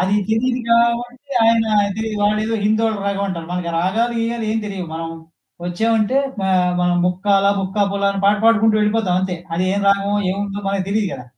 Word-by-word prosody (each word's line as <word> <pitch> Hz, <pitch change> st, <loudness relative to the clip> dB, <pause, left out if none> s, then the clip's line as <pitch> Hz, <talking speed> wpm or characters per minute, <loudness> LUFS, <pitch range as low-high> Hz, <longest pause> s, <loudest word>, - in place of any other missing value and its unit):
అది 190 Hz, +2 st, +1 dB
తెలీదు 245 Hz, +3 st, 0 dB
కాబట్టి 240 Hz, +3 st, +1 dB
ఆయన 225 Hz, 0 st, +4 dB, 0.3 s
తెలీదు. 220 Hz, -1 st, -3 dB
వాడేదో 215 Hz, +2 st, +1 dB
హిందోల 220 Hz, +1 st, +2 dB
రాగం 200 Hz, 0 st, -1 dB
అంటారు. 170 Hz, -4 st, -5 dB
మనకి 180 Hz, -1 st, -3 dB
రాగాలు 220 Hz, +7 st, 0 dB
గీయాలు 230 Hz, 0 st, -2 dB
ఏమి 220 Hz, +1 st, 0 dB
తెలీదు. 195 Hz, -3 st, -5 dB
మనం 165 Hz, 0 st, -4 dB, 0.6 s
వచ్చామంటే 220 Hz, +6 st, 0 dB, 0.2 s
పా 190 Hz, -, -1 dB, 0.3 s
మనం 180 Hz, 0 st, +2 dB
'ముక్కాలా 195 Hz, +2 st, +2 dB
ముక్కాబులా' 200 Hz, +1 st, 0 dB
అని 195 Hz, -, -3 dB
పాట 205 Hz, +1 st, +4 dB
పాడుకుంటూ 220 Hz, -1 st, +4 dB
వెళ్ళిపోతాం 210 Hz, -3 st, +1 dB
అంతే. 185 Hz, -1 st, -2 dB, 0.2 s
అది 180 Hz, +2 st, 0 dB
ఏం 200 Hz, -, 0 dB
రాగమొ, 200 Hz, +1 st, +1 dB, 0.2 s
ఏముందో 200 Hz, +1 st, -4 dB
మనకు 195 Hz, -1 st, -1 dB
తెలీదు 210 Hz, 0 st, +1 dB
కదా! 125 Hz, -, -8 dB
205 Hz, 170 wpm, -19 LUFS, 190-225 Hz, 0.6 s, ఆయన